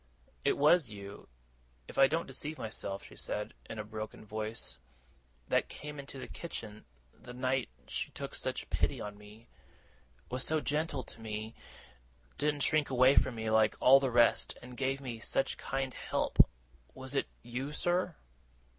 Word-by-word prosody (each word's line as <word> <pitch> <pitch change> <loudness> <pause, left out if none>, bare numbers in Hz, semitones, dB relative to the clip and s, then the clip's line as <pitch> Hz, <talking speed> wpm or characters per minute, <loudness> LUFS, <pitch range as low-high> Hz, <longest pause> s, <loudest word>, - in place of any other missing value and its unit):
'It - - +3
was 150 0 +5
you, 100 -1 -9 0.6
if - - -9
I 135 0 +7
don't 165 +4 0
deceive 145 +4 -4
myself,' 100 -3 -4
she - - -12
said, 105 - -3 0.2
in 115 - -5
a 105 - -2
broken 110 0 -6
voice, 110 - -4 0.7
'that - - +2
came 150 0 -7
into 140 0 -7
the 130 - -6
kitchen, 110 -10 -7 0.3
the 125 0 -11
night 130 0 0 0.2
she - - -2
took - - -6
such - - -3
pity - - +1
on 105 0 -5
me; 105 +3 -14 0.8
was 125 +1 0
so 155 0 +2
gentle 150 -2 -1
to 115 - -11
me; 110 0 -4 0.9
didn't 145 -1 +2
shrink 155 0 +3
away 130 +1 +6
from 125 - +4
me 110 -1 -2
like 110 -1 +5
all 135 +2 +8
the 135 -1 +1
rest, 120 -1 +4
and 125 0 -9
gave 135 +1 0
me 120 -4 -5
such 135 - 0
kind 135 -1 -2
help! - - +3 0.5
Was 130 +1 -5
it 140 - +1 0.2
you, 125 +4 -3
sir? 175 +2 +1
125 Hz, 165 wpm, -33 LUFS, 110-140 Hz, 0.9 s, all